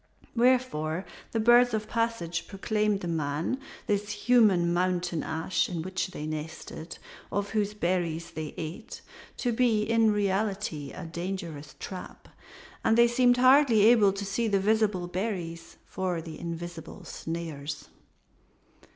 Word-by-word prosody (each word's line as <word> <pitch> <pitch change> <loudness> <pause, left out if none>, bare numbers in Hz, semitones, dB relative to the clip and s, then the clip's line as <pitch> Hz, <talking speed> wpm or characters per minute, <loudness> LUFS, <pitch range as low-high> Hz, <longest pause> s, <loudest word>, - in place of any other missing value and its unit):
Wherefore 230 -10 +2 0.3
the 225 - 0
birds 240 +1 +6
of 215 0 -3
passage 230 -8 -1
proclaimed 210 0 0
the 175 - -4
man, 160 - -1 0.3
this 205 0 0
human 205 -10 +4
mountain 180 -2 0
ash 165 +8 -1
in 170 -3 -3
which 185 0 -2
they 150 -5 -7
nested 155 0 -6
and 160 +2 -8 0.3
of 200 0 -2
whose 210 -1 0
berries 170 -3 -1
they 155 -2 -6
ate, 170 +8 -6 0.4
to 245 - 0
be 225 -2 +2
in 225 0 +3
reality 200 -7 -1
a - - -7
dangerous 170 -3 -5
trap; 185 -2 -8 0.5
and 225 - +3
they 235 0 +7
seemed 245 0 +4
hardly 255 -4 +6
able 220 -4 +6
to 200 +1 -4
see 220 +4 -1
the 200 -2 +2
visible 210 -2 +2
berries 175 -3 -4
for 185 -2 -2
the 160 -1 -8
invisible 170 0 -7
snares. 160 -3 -5
190 Hz, 135 wpm, -28 LUFS, 165-220 Hz, 0.5 s, they